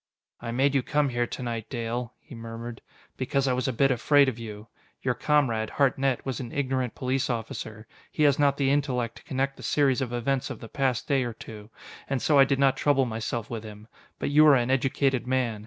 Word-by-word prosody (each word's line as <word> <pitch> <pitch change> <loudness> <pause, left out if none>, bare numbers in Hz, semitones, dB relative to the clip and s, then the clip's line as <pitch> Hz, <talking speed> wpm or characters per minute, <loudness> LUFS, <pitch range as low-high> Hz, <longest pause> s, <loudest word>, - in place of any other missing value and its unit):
"I 120 - -5
made 135 +4 +2
you 135 - +3
come 145 +2 +1
here 120 -1 -1
to 130 - -6
night, 115 -2 -4
Dale," 120 0 -4
he - - -15
murmured, 115 0 -7 0.4
"because 135 +1 0
I 130 - +2
was 130 +2 -1
a - - +1
bit 135 +3 +2
afraid 140 +3 +4
of 120 -3 -2
you. 105 -1 -8 0.4
Your 125 - +1
comrade, 120 -5 +1
Hartnett, 135 -2 +1
was 130 -3 -3
an 120 -3 -6
ignorant 130 -4 -1
police 130 +1 -1
officer. 110 -2 -5 0.3
He 155 - 0
has 145 -1 +4
not 140 -1 +3
the 135 -1 +2
intellect 125 -5 -1
to - - -15
connect 135 +1 -2
the - - -11
series 140 -3 +2
of 125 -3 -2
events 125 +2 -1
of - - -6
the 115 - -10
past 130 -4 -1
day 135 -2 +2
or 120 -1 -4
two, 105 -1 -11 0.4
and 135 -1 0
so 145 +3 +3
I 135 - +8
did 135 0 0
not 135 -1 +3
trouble 140 -2 +2
myself 115 0 -3
with 115 -2 -4
him. 105 0 -11 0.3
But - - -2
you 150 +1 +6
are 145 - +8
an 125 0 +1
educated 135 -1 +1
man. 125 -4 0
130 Hz, 220 wpm, -26 LUFS, 115-135 Hz, 0.4 s, I